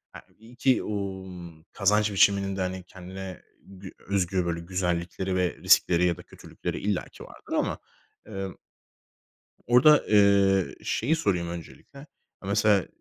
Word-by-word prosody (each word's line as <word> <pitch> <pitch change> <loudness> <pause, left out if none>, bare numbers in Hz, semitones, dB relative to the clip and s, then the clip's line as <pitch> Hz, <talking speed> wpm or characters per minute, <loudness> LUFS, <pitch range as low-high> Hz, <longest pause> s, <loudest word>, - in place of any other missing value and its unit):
e - - -8 0.2
iyi 115 +3 -16
ki, 130 +1 +2
o 100 -2 -4
m 85 -3 -11
kazanç 105 +1 +2
biçiminin 100 0 +3
de, 95 - -3
hani, 95 0 -3
kendine 95 0 -9 0.2
gü 95 -1 -12
özgü 95 -2 -1
böyle 85 -1 -2
güzellikleri 90 +1 -2
ve 90 -4 0
riskleri 90 0 +4
ya 85 -1 +1
da 90 - -11
kötülükleri - - -7
illaki 100 -2 -3
vardır - - -11
ama, - - 0 0.5
emm 95 -3 -6 1.1
orada, 130 +5 +5
eee, 100 -2 +4
şeyi 160 - 0
sorayım 90 - -1
öncelikle, 85 - -10 0.5
e - - -6
mesela, 100 -1 +2
95 Hz, 140 wpm, -26 LUFS, 90-100 Hz, 1.1 s, orada